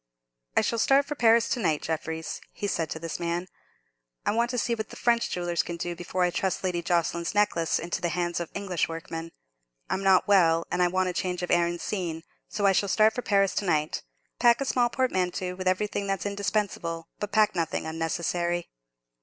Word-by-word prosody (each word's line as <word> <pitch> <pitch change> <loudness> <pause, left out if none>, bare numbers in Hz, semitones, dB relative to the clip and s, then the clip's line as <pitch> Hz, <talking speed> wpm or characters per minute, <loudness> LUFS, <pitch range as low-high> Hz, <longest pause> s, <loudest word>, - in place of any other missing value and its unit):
"I - - +7
shall 230 +2 0
start 275 +4 +4
for 295 - -3
Paris 230 -3 +4
to 250 - 0
night, 160 -8 0
Jeffreys," 160 0 -3
he - - -5
said 165 -5 -1
to - - -4
this 165 0 -5
man. 170 +1 -2 0.8
"I - - +3
want 235 +2 +1
to 250 - -2
see 235 0 +1
what 220 -2 -4
the - - -10
French 235 -1 +2
jewellers 175 -1 0
can 170 - -6
do 175 +1 -3
before 180 +2 -2
I 180 - +2
trust 190 +2 -1
Lady 180 -2 0
Jocelyn's 170 +1 0
necklace 175 -6 +2
into 170 +1 -3
the 175 - 0
hands 175 +1 -1
of 170 - -4
English 190 -5 -1
workmen. 165 0 -6 0.6
I'm 190 - 0
not 190 0 +4
well, 165 -5 +4
and 180 - +1
I 180 - +5
want 185 0 0
change 180 -1 -2
of 180 - -2
air 175 0 +4
and 175 0 -3
scene, 170 -6 -3 0.3
so 205 -1 -1
I 195 - +6
shall 195 +1 +1
start 215 +2 +4
for 245 - -3
Paris 195 -4 +2
to 205 - -1
night. 155 -3 0 0.4
Pack 235 -1 +5
a 275 - -1
small 245 -2 +2
portmanteau 185 -8 -1
with 185 0 -4
everything 200 +2 0
that's 195 -1 -1
indispensable, 200 -5 -2
but 210 - -4
pack 215 0 +4
nothing 165 -2 -1
unnecessary." 170 +2 -2
180 Hz, 205 wpm, -27 LUFS, 170-205 Hz, 0.8 s, I